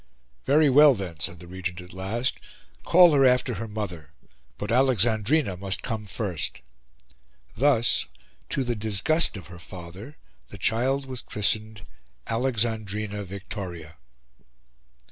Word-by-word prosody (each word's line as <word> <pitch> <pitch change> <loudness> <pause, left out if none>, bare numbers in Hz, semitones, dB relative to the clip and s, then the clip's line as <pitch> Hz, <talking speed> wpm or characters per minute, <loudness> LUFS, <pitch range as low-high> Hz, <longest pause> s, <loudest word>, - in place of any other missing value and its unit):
"Very 150 +2 +4
well, 145 +1 +7
then," 90 -6 -6
said 85 +4 -2
the 90 - -11
Regent 90 0 -5
at 90 +1 -11
last, 105 +7 -2 0.4
"call 175 -2 +6
her 140 -1 +4
after 125 -1 +3
her 110 +2 -5
mother. 95 -9 -6 0.5
But 105 - -4
Alexandrina 120 - +2
must 95 +1 -3
come 110 -3 -4
first." 95 - -4 0.9
Thus, 120 - +3 0.4
to 135 - -1
the 120 -1 -2
disgust 110 +8 +3
of 95 - -10
her 85 0 -12
father, 95 - -10 0.3
the 100 - -11
child 130 +7 0
was 130 -3 -6
christened 110 0 -2 0.4
Alexandrina 110 -4 -1
Victoria. 90 -5 -8
110 Hz, 125 wpm, -25 LUFS, 95-125 Hz, 0.9 s, well